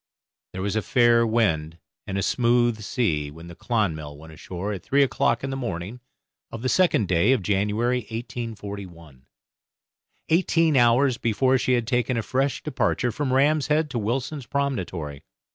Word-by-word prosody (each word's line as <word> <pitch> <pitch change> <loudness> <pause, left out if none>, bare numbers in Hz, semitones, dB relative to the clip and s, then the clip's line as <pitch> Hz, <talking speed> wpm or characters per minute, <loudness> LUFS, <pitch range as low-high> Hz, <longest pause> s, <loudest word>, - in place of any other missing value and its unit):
There 95 - -4
was 100 +1 -2
a 110 - +1
fair 120 0 +3
wind 85 -9 0 0.3
and 95 - -3
a 100 - 0
smooth 120 -2 +2
sea 85 - -1
when 80 +3 -12
the 85 - -10
'Clonmel' 80 -12 -2
went 80 +1 -13
ashore 90 +6 -5
at 95 - -6
three 140 +8 +3
o'clock 120 -2 0
in 135 - -3
the - - -3
morning 110 -3 -5 0.5
of 115 0 -8
the 130 - 0
second 175 - +3
day 90 +8 +3
of 120 -7 -1
January, 105 +6 +1
1841. 100 - -7 1.0
Eighteen 165 -2 +3
hours 120 +1 +4
before 130 +4 +2
she 130 - +1
had 120 -2 +1
taken 125 +1 0
a 115 - -1
fresh 135 +5 -1
departure 125 -1 0
from 135 +3 -2
Ram's 140 +1 +3
Head 150 0 +1
to 120 - -2
Wilson's 125 +5 -3
Promontory. 95 - -3
115 Hz, 160 wpm, -24 LUFS, 95-130 Hz, 1.0 s, hours